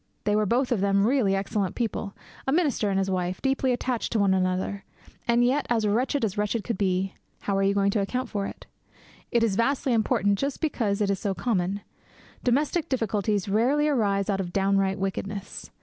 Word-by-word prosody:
They 210 - +1
were 210 -1 +2
both 250 +5 +1
of 225 -6 +1
them 200 0 +3
really 230 -6 +2
excellent 195 -1 -1
people; 220 -3 -3 0.3
a - - +2
minister 290 - +1
and 195 - 0
his 195 0 0
wife; 180 0 -1
deeply 270 -1 +1
attached 245 -1 -1
to 225 - +2
one 200 -2 +3
another; 185 +1 -1 0.4
and 240 +1 +4
yet 270 +3 +1
as 230 -2 +2
wretched 245 +5 +1
as 205 0 -3
wretched 210 +1 0
could 235 - -2
be. 190 -1 0 0.3
How 200 - -1
are 195 - +2
you 195 0 +2
going 200 0 +3
to 205 - +1
account 250 +6 -2
for 200 -3 -2
it? - - -10 0.7
It 235 -1 +3
is 215 -4 +1
vastly 255 +3 +1
important 205 -3 +2
just 275 0 -2
because 225 -10 0
it 200 -1 +2
is 195 - -1
so 200 -3 -2
common. 195 -3 -1 0.6
Domestic 290 +6 +1
difficulties 210 -5 0
rarely 255 +9 +2
arise 200 -8 +1
out 195 -2 0
of 180 -2 -3
downright 195 0 +1
wickedness. 195 +1 -4
205 Hz, 195 wpm, -26 LUFS, 195-245 Hz, 0.7 s, and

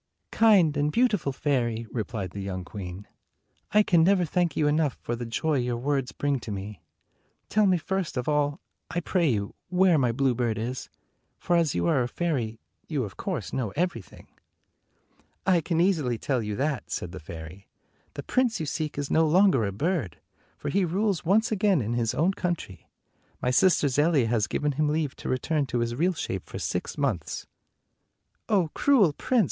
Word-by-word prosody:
"Kind 190 -10 +4
and 145 +1 +1
beautiful 210 - +2
fairy," 120 -5 -1
replied 110 -5 -4
the 100 - -6
young 95 -2 -4
queen, 95 0 -8 0.6
"I 210 +1 +5
can 170 -5 +4
never 185 0 +4
thank 170 -1 0
you 155 - +2
enough 150 -2 +1
for 120 - -3
the 120 0 -5
joy 150 +5 0
your 120 -1 -1
words 135 +1 -1
bring 145 -2 -1
to 115 - -7
me. 100 0 -6 0.7
Tell 215 -1 +3
me 185 -1 +4
first 180 -3 -3
of 125 - -2
all, 145 -1 +1 0.3
I 175 - -1
pray 175 -1 +1
you, 100 -4 -1 0.2
where 180 -3 +4
my 125 -3 +2
bluebird 120 -3 0
is; 120 +3 -4 0.5
for 175 - 0
as 165 -4 +2
you 85 -1 0
are 125 +9 +3
a 120 - 0
fairy, 125 -8 -2 0.3
you 145 -5 -1
of 100 -4 -7
course 165 - -4
know 125 -5 -1
everything." 165 - -3 0.7
" - - -39
I 170 - +3
can 165 +1 -1
easily 160 -10 +2
tell 130 +1 -1
you 105 -1 -3
that," 145 +3 -2
said 90 - -4
the 95 - -8
fairy. 80 +4 -10 0.5
"The - - -5
prince 250 -5 +1
you 160 - -2
seek 150 0 -3
is 145 -1 -3
no 160 0 +4
longer 175 - +4
a 100 - -2
bird, 140 - -2 0.4
for - - -4
he 195 0 +2
rules 190 +2 0
once 215 +6 +3
again 205 -4 +3
in 115 -1 -2
his 115 -2 0
own 180 +5 +2
country. 170 - -4 0.5
My 125 - 0
sister 155 +2 +4
Zelia 145 0 +3
has 115 -2 +1
given 150 0 0
him 150 +2 0
leave 150 -2 -1
to - - -6
return 140 +3 0
to 120 - -2
his 120 0 -1
real 175 +9 +1
shape - - -4
for - - -7
six - - -3
months." - - -2 1.0
"Oh, 185 -7 +2
cruel 225 - +4
prince!" 250 - +1
145 Hz, 185 wpm, -27 LUFS, 115-175 Hz, 1.0 s, I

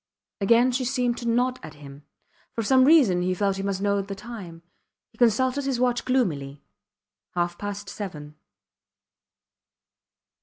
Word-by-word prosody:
Again 235 +5 +4
she 255 +1 -1
seemed 250 -1 0
to 235 - -5
nod 250 +2 +1
at 155 -1 -10
him. 145 0 -13 0.5
For 230 - -2
some 260 +3 +4
reason 260 - +5
he 185 +1 0
felt 195 0 0
he - - -3
must 195 0 -2
know 200 0 +1
the 195 0 -7
time. 195 -7 -9 0.5
He 220 - -26
consulted 255 +4 +2
his 265 -3 -1
watch 245 -1 +1
gloomily. 150 - -1 0.7
Half 175 0 -1
past 205 0 -5
seven. 155 -8 -7
205 Hz, 145 wpm, -25 LUFS, 180-250 Hz, 0.7 s, reason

